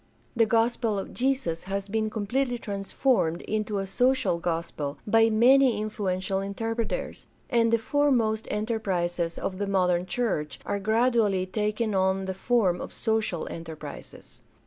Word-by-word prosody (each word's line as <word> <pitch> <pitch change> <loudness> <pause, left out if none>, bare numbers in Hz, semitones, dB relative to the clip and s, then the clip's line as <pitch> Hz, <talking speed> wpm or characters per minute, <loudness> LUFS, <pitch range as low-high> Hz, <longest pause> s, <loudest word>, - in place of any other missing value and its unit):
The 225 -1 +4
gospel 230 -1 +1
of 195 - -5
Jesus 250 -12 -1
has 195 +1 -3
been 215 +1 -1
completely 245 +4 -1
transformed 200 - 0
into 215 -1 -2
a 195 - -1
social 245 -2 +1
gospel 165 -4 -3
by 225 +1 +4
many 250 +2 +5
influ 210 -3 -2
ential 190 +1 -2
interpreters, 225 - -3 0.2
and 230 -2 +3
the 230 - +5
foremost 230 -4 +1
enterprises 185 -6 -1
of 185 0 -4
the 205 - -1
modern 180 -2 +1
church 180 - -2
are 200 - -1
gradually 220 -2 +2
taking 215 +3 -1
on 190 0 +1
the 190 - -3
form 190 -3 +1
of - - -8
social 220 -7 -1
enterprises. 160 -3 -9
210 Hz, 140 wpm, -27 LUFS, 185-230 Hz, 0.2 s, many